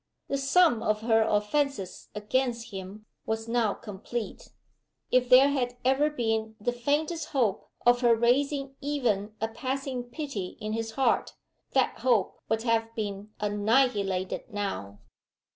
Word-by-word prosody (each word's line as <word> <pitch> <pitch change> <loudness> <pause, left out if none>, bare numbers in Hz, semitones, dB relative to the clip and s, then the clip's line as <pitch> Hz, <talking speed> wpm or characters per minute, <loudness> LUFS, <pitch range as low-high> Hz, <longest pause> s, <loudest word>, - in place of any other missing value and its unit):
The 275 - 0
sum 275 -3 +4
of 215 0 0
her 225 0 +3
offenses 210 0 0
against 235 +2 -1
him 195 +2 -8 0.2
was 220 0 -2
now 230 -3 +1
complete. 215 +2 -6 0.6
If 250 -1 +3
there 265 +3 +8
had 245 -3 -1
ever 270 +3 +3
been 225 -5 -1
the 225 +4 0
faintest 295 +6 -1
hope 230 -8 0 0.2
of 245 0 +5
her 240 -2 +5
raising 275 +4 +1
even 235 -8 -1
a 220 - 0
passing 255 +2 -3
pity 245 - -5
in 215 -1 -3
his 225 0 -3
heart, 265 +3 +1 0.4
that - - +2
hope 235 -7 +1
would 225 0 0
have 230 -1 0
been 205 -1 -4
annihilated 205 -2 +1
now. 100 - -4
230 Hz, 135 wpm, -28 LUFS, 210-265 Hz, 0.6 s, there